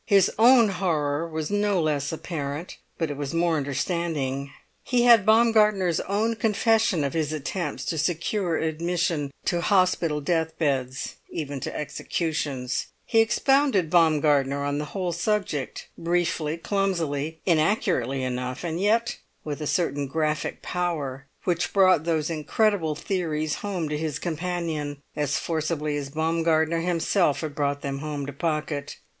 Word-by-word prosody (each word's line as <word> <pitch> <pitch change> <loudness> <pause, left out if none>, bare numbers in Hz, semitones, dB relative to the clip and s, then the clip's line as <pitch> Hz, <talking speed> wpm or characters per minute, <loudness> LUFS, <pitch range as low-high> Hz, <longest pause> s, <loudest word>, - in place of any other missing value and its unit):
His 200 -3 +5
own 235 -1 +7
horror 165 -4 -1
was 160 +2 -3
no 205 -2 +2
less 150 -3 0
apparent, 155 -1 -5 0.2
but 165 -3 -1
it 145 - -5
was 145 +2 -4
more 165 -1 +2
understanding. 140 -1 -2 0.3
He 245 -2 +1
had 230 -4 +6
Baumgartner's 215 -6 +4
own 220 +3 0
confession 220 -5 +2
of 140 - -1
his 155 -2 0
attempts 155 +4 -3
to 160 - -2
secure 170 +2 0
admission 160 -2 -1 0.2
to 175 -2 +1
hospital 180 -5 +2
death 160 +2 -1
beds, 135 -4 -1
even 145 -3 -4
to - - -5
executions; 150 -4 -2 0.2
he 225 - +3
expounded 230 - +3
Baumgartner 145 -4 +3
on 145 0 -1
the 150 - -3
whole 180 +3 -3
subject, 175 -5 -2
briefly, 170 -2 0
clumsily, 165 -5 -1
inaccurately 155 - +1
enough, 125 +2 -3
and 170 +1 -2
yet 230 +3 +1 0.2
with 150 0 -5
a 150 - -2
certain 145 -5 0
graphic 155 +1 -2
power 145 -7 -3 0.2
which 170 -3 0
brought 185 -5 +5
those 160 -1 0
incredible 165 +1 +1
theories 155 -3 -2
home 190 -6 -2
to 150 - -1
his 155 -2 -2
companion 165 -3 -3 0.2
as 145 -2 0
forcibly 155 -2 -1
as 140 -1 -4
Baumgartner 160 +1 +1
himself 170 -1 +1
had 155 -3 -4
brought 145 -1 -1
them 140 -1 -3
home 145 -1 -4
to 140 - -6
Pocket. 150 -2 -2
160 Hz, 140 wpm, -25 LUFS, 145-180 Hz, 0.3 s, own